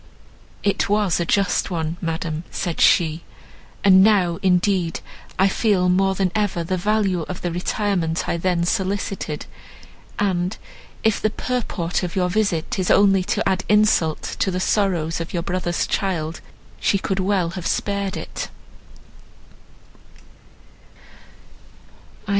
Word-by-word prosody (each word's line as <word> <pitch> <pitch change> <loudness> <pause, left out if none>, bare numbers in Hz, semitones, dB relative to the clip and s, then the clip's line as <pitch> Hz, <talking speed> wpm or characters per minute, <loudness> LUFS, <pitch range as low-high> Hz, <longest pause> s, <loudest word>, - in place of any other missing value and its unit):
"It 200 -1 +1
was 205 -4 +2
a 170 - 0
just 195 -3 +1
one, 165 -2 -2
madam," 165 -1 -3
said 175 -3 -3
she; 160 -1 +4 0.6
"and 190 -2 +7
now, 190 -5 +3
indeed, 180 -2 +1 0.4
I 190 - +4
feel 195 -3 +2
more 190 +1 +2
than 190 -1 0
ever 205 -5 0
the 185 +3 -1
value 195 -1 +1
of 185 - -6
the 175 - -1
retirement 180 -2 -1
I - - 0
then 175 0 0
solicited; 190 -5 -2 0.7
and, 185 -1 0 0.5
if 220 -2 +2
the 215 - +2
purport 210 -8 -2
of 180 -2 -4
your 180 -1 +1
visit 195 -5 0
is 185 - 0
only 195 -1 +5
to - - 0
add 190 -1 0
insult 210 -7 +3 0.2
to - - +1
the 180 -1 -2
sorrows 175 -5 0
of 165 - -6
your 170 - -1
brother's 175 -1 -1
child, 170 -5 -2 0.4
she 200 - +2
could 195 0 -2
well 185 -3 +1
have 180 0 -4
spared 200 -1 -1
it." - - -6
185 Hz, 130 wpm, -22 LUFS, 170-200 Hz, 0.7 s, and